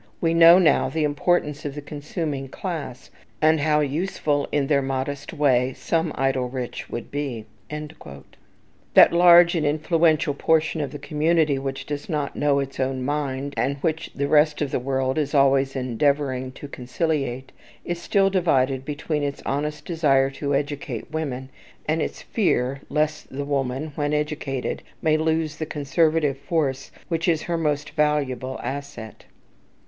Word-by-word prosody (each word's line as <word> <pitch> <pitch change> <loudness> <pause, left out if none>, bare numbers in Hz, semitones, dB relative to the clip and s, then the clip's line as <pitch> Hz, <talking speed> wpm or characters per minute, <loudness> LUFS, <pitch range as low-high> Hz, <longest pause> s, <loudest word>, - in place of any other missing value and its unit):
We 165 -1 +1
know 165 +1 +8
now 180 -4 +3
the 160 -1 -1
importance 150 0 0
of 145 -1 -5
the 145 - -5
consuming 145 -1 -4
classes, 145 -5 -6 0.3
and 155 0 +4
how 150 +1 +2
useful 150 -1 -1
in 145 -2 +1
their 140 0 +2
modest 135 +1 -3
way 130 -5 +2
some 165 +3 -1
idle 135 -2 0
rich 125 -1 -5
would 120 - -6
be." 135 -6 -4 0.2
That 150 - -1
large 175 0 +7
and 165 -3 0
influential 155 0 +2
portion 160 +2 +1
of 140 -3 -3
the 145 - -6
community 150 0 +1
which 135 0 -4
does 145 +2 -5
not 150 -4 -2
know 145 -1 +2
its 135 -1 -3
own 130 -1 -1
mind, 140 -1 -2
and 140 +2 0
which 160 -1 -1
the 140 0 -1
rest 150 +1 +4
of 145 -3 -2
the - - 0
world 130 +2 -1
is 145 -1 -1
always 135 -1 +3
endeavouring 130 +1 0
to 145 - -9
conciliate, 135 -1 -3 0.3
is 175 0 -3
still 195 +1 +2
divided 135 -8 +1
between 150 +1 -3
its 140 -1 -3
honest 150 +2 -2
desire 140 -5 +2
to 140 +1 -2
educate 140 -4 -4
women, 135 -5 -4 0.4
and 155 +1 +1
its - - -4
fear 135 - 0
lest 150 0 -1
the 140 +2 -4
woman, 140 +1 -2
when 145 0 -1
educated, 150 -3 -2 0.2
may 155 -1 +2
lose 160 -1 0
the 155 - -3
conservative 150 -1 +1
force 140 -5 -1 0.2
which 165 0 -1
is 165 -3 +2
her 170 - -2
most 150 -3 -1
valuable 140 -4 0
asset. 140 -6 -7
145 Hz, 155 wpm, -23 LUFS, 135-155 Hz, 0.4 s, know